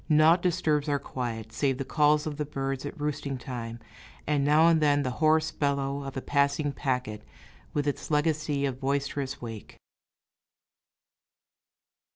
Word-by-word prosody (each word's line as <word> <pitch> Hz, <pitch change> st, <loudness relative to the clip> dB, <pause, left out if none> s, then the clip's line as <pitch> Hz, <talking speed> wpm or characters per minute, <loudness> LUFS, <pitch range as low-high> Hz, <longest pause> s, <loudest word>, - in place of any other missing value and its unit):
Naught 155 Hz, +3 st, +5 dB
disturbs 160 Hz, -5 st, +1 dB
our 145 Hz, -, +2 dB
quiet, 115 Hz, -5 st, -5 dB
save 135 Hz, +1 st, 0 dB
the 135 Hz, -, -3 dB
calls 150 Hz, +1 st, +3 dB
of 150 Hz, -2 st, -4 dB
the 150 Hz, -, -1 dB
birds 135 Hz, -1 st, -3 dB
at 145 Hz, -, -9 dB
roosting 145 Hz, -2 st, -2 dB
time, 120 Hz, -2 st, -6 dB, 0.5 s
and 145 Hz, -2 st, +1 dB
now 150 Hz, +3 st, +5 dB
and 165 Hz, -2 st, +4 dB
then 145 Hz, -1 st, +3 dB
the 130 Hz, -, -1 dB
hoarse 155 Hz, 0 st, +4 dB
bellow 140 Hz, -1 st, -1 dB
of 135 Hz, -1 st, -6 dB
a -, -, -2 dB
passing 140 Hz, +1 st, +1 dB
packet, 125 Hz, -6 st, -2 dB, 0.5 s
with 145 Hz, -1 st, 0 dB
its 145 Hz, -, -3 dB
legacy 150 Hz, -2 st, +1 dB
of 130 Hz, -2 st, -3 dB
boisterous 140 Hz, -1 st, -2 dB
wake. 115 Hz, -3 st, -8 dB
140 Hz, 150 wpm, -28 LUFS, 135-150 Hz, 0.5 s, Naught